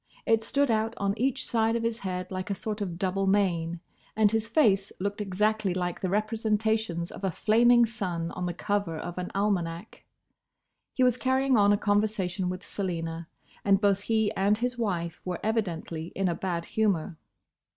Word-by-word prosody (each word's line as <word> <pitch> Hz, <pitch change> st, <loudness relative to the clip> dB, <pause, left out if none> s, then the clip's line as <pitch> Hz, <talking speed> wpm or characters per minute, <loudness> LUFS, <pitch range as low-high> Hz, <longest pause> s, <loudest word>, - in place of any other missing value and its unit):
It 225 Hz, -1 st, +3 dB
stood 280 Hz, +3 st, +1 dB
out 220 Hz, +1 st, 0 dB
on 200 Hz, 0 st, 0 dB
each 265 Hz, +2 st, 0 dB
side 225 Hz, -1 st, +1 dB
of 230 Hz, -, -1 dB
his 230 Hz, 0 st, -1 dB
head 185 Hz, -2 st, -4 dB
like 185 Hz, +2 st, -4 dB
a 200 Hz, -, 0 dB
sort 210 Hz, +2 st, -4 dB
of 180 Hz, -4 st, -3 dB
double 195 Hz, +1 st, 0 dB
mane, 175 Hz, -4 st, +1 dB, 0.3 s
and 215 Hz, -2 st, +4 dB
his 225 Hz, 0 st, 0 dB
face 205 Hz, -9 st, +3 dB
looked 200 Hz, +2 st, -2 dB
exactly 210 Hz, 0 st, 0 dB
like 180 Hz, -1 st, -2 dB
the 185 Hz, -, -1 dB
representations 215 Hz, -3 st, 0 dB
of -, -, -10 dB
a 190 Hz, -, +2 dB
flaming 235 Hz, +6 st, +4 dB
sun 180 Hz, -8 st, -3 dB
on 180 Hz, 0 st, -3 dB
the 175 Hz, -, -2 dB
cover 200 Hz, -4 st, -1 dB
of 175 Hz, +3 st, -5 dB
an 180 Hz, -, -4 dB
almanac. 195 Hz, -2 st, -2 dB, 0.9 s
He 260 Hz, -, +1 dB
was 250 Hz, -1 st, +4 dB
carrying 260 Hz, +1 st, +2 dB
on 205 Hz, -2 st, +5 dB
a 205 Hz, -, +4 dB
conversation 205 Hz, -3 st, 0 dB
with 185 Hz, +1 st, -5 dB
Selina, 165 Hz, -4 st, -4 dB, 0.4 s
and 195 Hz, -1 st, +4 dB
both 200 Hz, -2 st, +3 dB
he 220 Hz, 0 st, +1 dB
and 200 Hz, +2 st, +2 dB
his 245 Hz, +2 st, -1 dB
wife 180 Hz, -7 st, -2 dB
were 180 Hz, -1 st, -3 dB
evidently 170 Hz, -7 st, -2 dB
in 195 Hz, -1 st, +1 dB
a 175 Hz, -, +1 dB
bad 170 Hz, -1 st, -3 dB
humour. 195 Hz, -6 st, 0 dB
200 Hz, 180 wpm, -28 LUFS, 180-220 Hz, 0.9 s, on